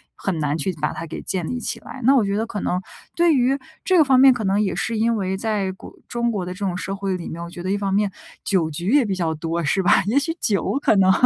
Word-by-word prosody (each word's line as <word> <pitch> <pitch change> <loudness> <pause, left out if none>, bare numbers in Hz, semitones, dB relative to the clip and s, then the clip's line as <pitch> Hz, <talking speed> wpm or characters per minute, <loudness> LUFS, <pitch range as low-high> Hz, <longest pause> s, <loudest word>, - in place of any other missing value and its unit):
很 185 -5 -3
难 150 0 0
去 180 +4 -1
把 150 - +1
它 165 - -6
给 160 - -7
建 180 -4 -2
立 250 - -3
起 - - -3
来。 265 - -10
那 270 +4 +5
我 250 - +4
觉 200 0 -1
得 220 - 0
可 210 - -4
能 180 +1 -1 0.3
对 340 -1 +4
于 260 +1 +2 0.3
这 375 - +3
个 320 - +7
方 265 -3 +4
面， 265 0 +8
可 240 -3 -4
能 195 +1 +2
也 200 -3 0
是 230 -1 -1
因 230 +2 +2
为 190 -2 -2
在 205 -2 -1
国 190 - -12
中 235 0 -1
国 200 -4 -2
的 180 - -5
这 185 - -13
种 185 -2 -1
社 195 +2 -4
会 195 -1 -2
里 175 - -7
面， 170 +1 -6
我 - - -6
觉 175 - -9
得 185 +2 -2
一 200 - +1
方 200 -1 -1
面 205 0 +2 0.3
酒 180 -5 +1
局 170 +4 -4
也 280 -2 +5
比 200 - -1
较 170 -3 -1
多 165 +2 -2
是 190 +6 +1
吧？ - - +4
也 230 +6 +2
许 305 +3 +1
酒 210 +6 +1
可 220 - +3
能 190 -1 +5
195 Hz, 310 characters per minute, -22 LUFS, 180-235 Hz, 0.3 s, 面